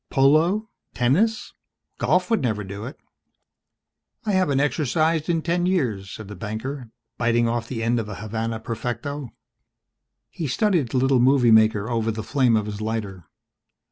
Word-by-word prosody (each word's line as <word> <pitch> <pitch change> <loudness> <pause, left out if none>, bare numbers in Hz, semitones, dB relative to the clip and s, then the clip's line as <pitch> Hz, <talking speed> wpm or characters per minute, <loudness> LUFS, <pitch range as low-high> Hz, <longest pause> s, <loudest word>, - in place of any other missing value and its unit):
"Polo, 160 +10 +3 0.3
tennis? 185 - +1 0.5
Golf 180 +3 +1
would 225 - +3
never 110 -5 -1
do 100 +2 -7
it." 130 - -9 1.3
"I 210 - 0
haven't 185 -8 +2
exercised 155 +3 +1
in 165 -2 +1
ten 175 +1 0
years," 120 - -1
said 110 +1 -8
the 105 - -8
banker, 110 +6 -5 0.3
biting 120 0 +2
off 115 0 -2
the 115 -3 -4
end 120 +1 +1
of 110 -2 -4
a 100 - -6
Havana 110 +2 -4
Perfecto. 120 +4 -4 1.0
He 160 - -4
studied 165 - +1
the 130 - -1
little 135 0 +3
movie 125 -1 +4
maker 110 -1 +4
over 115 -2 -1
the 110 0 -3
flame 125 -1 +2
of 105 - -1
his 105 0 -6
lighter. 105 -5 -4
120 Hz, 155 wpm, -23 LUFS, 110-150 Hz, 1.3 s, movie